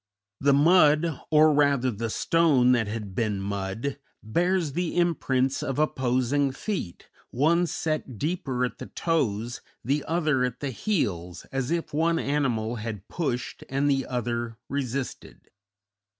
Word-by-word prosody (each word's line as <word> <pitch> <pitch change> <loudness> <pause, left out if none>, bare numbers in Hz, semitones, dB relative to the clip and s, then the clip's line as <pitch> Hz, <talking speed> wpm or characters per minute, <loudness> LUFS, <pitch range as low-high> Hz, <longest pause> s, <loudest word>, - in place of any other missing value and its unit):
The 140 0 +4
mud, 155 0 +4
or 155 0 +6
rather 140 -3 +3
the 115 +1 -3
stone 145 -3 +3
that 120 -4 +2
had 105 -2 -5
been 105 -1 -1
mud, 100 +7 -3 0.2
bears 170 - +1
the 175 +1 -2
imprints 135 -6 +1
of 135 - -3
opposing 135 -1 +1
feet, 180 - -5 0.2
one 170 +7 +2
set 155 -7 -3
deeper 140 - -1
at 125 - -6
the - - -7
toes, 120 -8 -1 0.2
the 140 +3 +1
other 155 -6 +1
at 125 -1 -2
the 140 -2 -3
heels, 100 - -2
as 135 -1 -2
if 165 -2 -2
one 165 +2 +2
animal 125 -7 0
had 110 -2 -6
pushed 130 -8 -3
and 135 +2 +1
the 135 -1 0
other 120 -2 -3
resisted. 135 -1 -5
135 Hz, 135 wpm, -26 LUFS, 120-155 Hz, 0.2 s, or